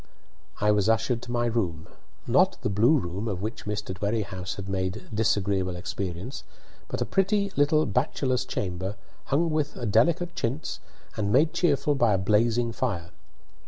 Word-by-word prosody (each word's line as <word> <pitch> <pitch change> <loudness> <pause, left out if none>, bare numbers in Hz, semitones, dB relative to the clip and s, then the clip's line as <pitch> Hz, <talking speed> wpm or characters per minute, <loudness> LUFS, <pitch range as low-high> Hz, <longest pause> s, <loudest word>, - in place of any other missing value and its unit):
I 105 0 +3
was 105 0 +2
ushered 115 +1 +1
to 120 - -7
my 120 0 +1
room 95 -9 -1 0.4
not - - +3
the - - 0
blue 115 +10 +4
room, 95 0 -3
of 95 -3 -3
which 110 +2 -5
Mr. 105 -2 -3
Dwerrihouse 100 -1 -2
had 100 -1 -6
made 95 -1 -3
disagreeable 100 -4 +1
experience, 95 +7 -5 0.4
but - - -4
a - - -5
pretty 200 +1 +1
little 150 +2 +3
bachelor's 130 -1 0
chamber, 95 +1 -3 0.3
hung 160 +4 +1
with 150 -1 -1
a 120 - -4
delicate 170 - +2
chintz 135 -1 -2 0.4
and 100 -1 0
made 150 +6 +4
cheerful 150 -3 +2
by 120 -6 +3
a - - +2
blazing 115 +4 +2
fire. 95 -8 -2
110 Hz, 160 wpm, -27 LUFS, 95-135 Hz, 0.4 s, blue